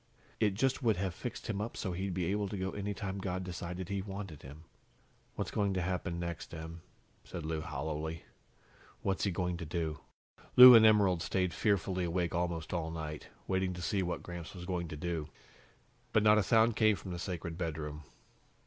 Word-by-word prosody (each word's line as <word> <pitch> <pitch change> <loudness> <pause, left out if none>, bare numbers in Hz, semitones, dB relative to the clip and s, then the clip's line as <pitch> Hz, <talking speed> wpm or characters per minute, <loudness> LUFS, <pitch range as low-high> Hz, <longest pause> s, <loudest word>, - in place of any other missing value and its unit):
It 105 -3 +2
just 135 +6 +1
would 115 -6 +2
have 95 -1 -1
fixed 120 +6 -6
him 105 -2 -2
up 115 - -4
so 95 - -2
he'd 95 +1 -3
be 90 -2 0
able 100 +3 0
to 100 - -4
go 95 0 -2
any 100 0 -3
time 100 -1 -4
God 95 -1 -3
decided 90 0 -5
He 100 0 -2
wanted 95 -5 -7
him." 75 +4 -11 0.7
"What's - - -3
going 100 -2 0
to 95 - 0
happen 90 -1 -2
next, 85 -1 -5
Em?" 80 +1 -7 0.4
said 85 -3 -7
Lou 80 0 -2
hollowly. 80 +1 -4 0.8
"What's 95 +1 0
he 100 - +1
going 90 -1 -1
to 85 - -6
do?" 80 -2 -2 0.6
Lou 125 0 +13
and 110 -1 +9
Emerald 100 -5 +4
stayed 90 -1 0
fearfully 95 -3 +1
awake 85 0 -1
almost 85 -1 -2
all 80 -2 -1
night, 80 -2 -6 0.2
waiting 95 -1 0
to 90 - -7
see 100 +3 +1
what 90 -1 -3
Gramps 85 0 -7
was 90 -1 -7
going 90 -2 -2
to 75 - -7
do. 80 -1 -3 0.8
But 110 - +4
not 105 0 +6
a - - +4
sound 115 +1 +4
came 110 -1 +4
from 90 +1 -8
the 85 - -4
sacred 85 -2 -4
bedroom. 75 -3 -4
90 Hz, 195 wpm, -33 LUFS, 85-100 Hz, 0.8 s, Lou